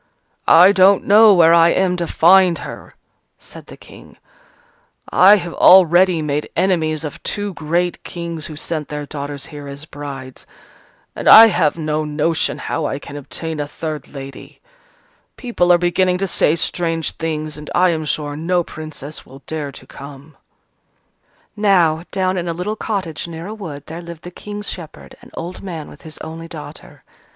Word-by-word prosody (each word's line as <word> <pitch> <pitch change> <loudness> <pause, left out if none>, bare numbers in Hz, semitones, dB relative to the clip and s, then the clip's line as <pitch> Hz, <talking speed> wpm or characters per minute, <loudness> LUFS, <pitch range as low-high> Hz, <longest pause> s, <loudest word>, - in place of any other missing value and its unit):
"I 180 +4 +7
don't 195 0 +4
know 215 +2 +7
where 165 -1 +6
I 170 0 +6
am 185 0 +1
to 170 -1 -3
find 180 0 +4
her," - - -10 0.4
said - - -13
the - - -12
King, - - -16 0.9
"I 195 +3 +7
have 175 -4 -4
already 180 -2 +5
made 150 0 -2
enemies 165 -4 0
of 150 - -7
two 205 -1 -3
great 170 +2 -2
Kings 170 -2 -6
who 155 - -9
sent 155 -1 -4
their 150 0 -6
daughters 145 -1 -6
here 145 -1 -8
as 140 +2 -7
brides: 140 -4 -9 0.7
and - - 0
I 225 +1 +10
have 155 -6 +1
no 155 -1 -2
notion 155 +2 -1
how 160 - -3
I 135 - -3
can 145 0 -11
obtain 155 +2 -6
a 145 - -3
third 155 -1 -6
lady. 135 -1 -11 0.8
People 230 -8 0
are 175 - +6
beginning 180 +1 +1
to 195 - -2
say 170 -3 +2
strange 165 -1 -1
things, 155 -2 -4
and 150 - -10
I 180 0 +4
am 160 -1 -3
sure 145 -1 -3
no 175 +3 0
Princess 155 -2 -9
will 135 +1 -16
dare 150 -3 -4
to 130 - -13
come." 140 +2 -12 1.2
Now, 175 -6 +2
down 185 -1 -1
in 175 -1 -3
a 170 - -2
little 190 +5 -3
cottage 185 -9 -4
near 165 0 -8
a 210 - -6
wood, 155 -10 -8
there 165 +2 -8
lived 170 -2 -11
the 175 - -9
King's 205 +2 -7
shepherd, 165 -4 -9
an - - -16
old 175 +2 -7
man 165 -6 -7
with 145 - -15
his 155 -1 -9
only 165 +1 -8
daughter. 160 -3 -11
165 Hz, 170 wpm, -18 LUFS, 150-180 Hz, 1.2 s, I